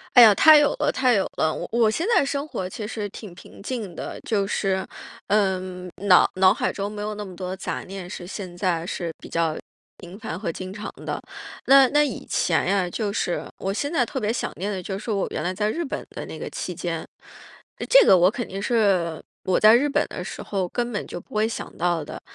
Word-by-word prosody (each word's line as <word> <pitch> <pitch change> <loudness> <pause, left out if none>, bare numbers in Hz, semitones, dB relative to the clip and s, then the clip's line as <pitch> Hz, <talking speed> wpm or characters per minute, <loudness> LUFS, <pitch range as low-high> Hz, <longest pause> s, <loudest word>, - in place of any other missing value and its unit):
哎 245 - +11
呀， 215 -3 +9
太 310 +7 +8
有 295 -1 +3
了 300 - +2
太 255 -2 +2
有 195 - +2
了。 155 0 +1
我 - - -5
我 230 -2 +3
现 330 - -1
在 - - +5
生 280 +1 -2
活 185 -10 -4
其 210 +3 -6
实 210 -2 -4
挺 200 -5 -10
平 185 - -14
静 215 -5 -5
的， - - -6
就 200 -3 0
是， 190 -2 -1 0.4
嗯， 185 -3 0 0.2
脑 180 -2 +7
脑 185 0 +6
海 - - -1
中 200 0 -3
没 210 0 -6
有 210 0 -3
那 210 0 -6
么 185 -2 -10
多 185 0 -4
杂 - - -4
念 190 -1 -8
是 180 -2 -7
现 185 -1 -7
在 175 -3 -1
是 170 -2 -4
比 - - -10
较 165 -2 0 0.4
频 180 +2 -11
繁 180 -5 -5
和 190 -3 -3
经 185 +3 -6
常 210 +2 -6
的。 - - -3 0.5
那 270 -1 +7
那 295 0 +4
以 295 - -3
前 - - +1
呀， 195 -2 +1
就 205 +1 -2
是 175 -3 -1
我 195 - -2
现 285 +9 -2
在 265 -7 +3
特 - - -5
别 215 +1 0
想 235 - -2
念 200 +4 -3
的 190 -2 -4
就 190 +2 -4
是 220 - -6
我 200 -2 0
原 - - -3
来 180 - -1
在 210 +2 0
日 335 +8 -2
本 275 - -5
的 - - -7
那 - - -8
个 - - -5
期 - - -5
间， - - -4 0.8
这 - - +8
个 - - +8
我 180 +2 +5
肯 240 +1 -4
定 195 - -5
是 195 -8 +1 0.2
我 185 - +2
在 215 +1 +8
日 285 +4 +2
本 280 - +1
的 - - -6
时 - - -7
候 190 -3 -2
根 240 +4 -2
本 205 - -3
就 175 - -7
不 - - -16
会 215 +1 +2
想 230 - -6
到 170 -2 0
的。 - - -8
200 Hz, 255 characters per minute, -24 LUFS, 185-230 Hz, 0.8 s, 哎